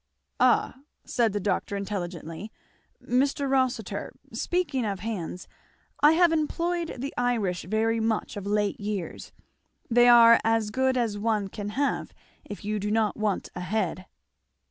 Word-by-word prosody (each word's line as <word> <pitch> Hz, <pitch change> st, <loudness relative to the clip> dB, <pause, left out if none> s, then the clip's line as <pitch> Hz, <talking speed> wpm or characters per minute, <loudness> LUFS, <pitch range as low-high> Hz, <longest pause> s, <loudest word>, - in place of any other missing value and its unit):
"Ah!" 260 Hz, -, +3 dB, 0.3 s
said 230 Hz, -3 st, +1 dB
the 205 Hz, -, -2 dB
doctor 200 Hz, 0 st, -1 dB
intelligently. 185 Hz, -1 st, -5 dB, 0.5 s
"Mr. 275 Hz, +3 st, +1 dB
Rossitur, 260 Hz, -2 st, -1 dB, 0.2 s
speaking 315 Hz, -8 st, -1 dB
of 200 Hz, -4 st, -3 dB
hands, 180 Hz, -5 st, -5 dB, 0.5 s
I 295 Hz, +2 st, +7 dB
have 345 Hz, 0 st, +4 dB
employed 335 Hz, +2 st, -1 dB
the 275 Hz, +3 st, -5 dB
Irish 220 Hz, -9 st, 0 dB
very 220 Hz, +4 st, +1 dB
much 220 Hz, -1 st, -1 dB
of 200 Hz, -1 st, -6 dB
late 205 Hz, 0 st, 0 dB
years 205 Hz, -4 st, -5 dB, 0.6 s
they 240 Hz, +1 st, +6 dB
are 235 Hz, -1 st, +8 dB
as 225 Hz, -1 st, +1 dB
good 260 Hz, +2 st, +1 dB
as 225 Hz, -4 st, -1 dB
one 210 Hz, -2 st, 0 dB
can 205 Hz, +1 st, -5 dB
have, 285 Hz, 0 st, -1 dB, 0.3 s
if 205 Hz, 0 st, -9 dB
you 210 Hz, 0 st, -1 dB
do 205 Hz, +1 st, -2 dB
not 215 Hz, -1 st, +1 dB
want 210 Hz, -3 st, -1 dB
a 180 Hz, -, -5 dB
head." 185 Hz, -1 st, -2 dB
220 Hz, 145 wpm, -27 LUFS, 200-250 Hz, 0.6 s, are